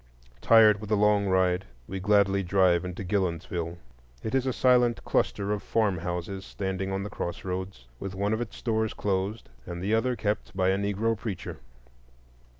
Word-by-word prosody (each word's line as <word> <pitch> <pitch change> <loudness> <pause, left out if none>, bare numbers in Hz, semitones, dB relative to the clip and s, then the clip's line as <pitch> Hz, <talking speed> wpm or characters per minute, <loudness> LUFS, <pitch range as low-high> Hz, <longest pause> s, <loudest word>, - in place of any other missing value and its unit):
Tired 110 -3 +6
with 105 - -7
the 105 - +3
long 105 -1 +3
ride, 95 -1 +2 0.2
we 95 - -4
gladly 100 0 +3
drive 90 -1 +3
into 90 +1 -5
Gillonsville. 85 -3 -2 0.5
It 110 - -3
is 135 0 +1
a - - +2
silent 125 -1 +3
cluster 100 +1 0
of 105 -1 -1
farmhouses 95 -2 -1
standing 95 -1 -3
on 95 0 -2
the 105 - -5
crossroads, 90 -6 -5
with 95 -1 -5
one 100 +2 0
of 110 - -1
its 120 - -6
stores 110 -2 -1
closed 100 +2 -2 0.2
and 85 0 -5
the 100 +4 -1
other 125 +3 +2
kept 105 -2 -3
by 95 -1 +3
a 95 - +3
Negro 100 +3 0
preacher. 100 -3 -6
100 Hz, 165 wpm, -27 LUFS, 95-105 Hz, 0.5 s, Tired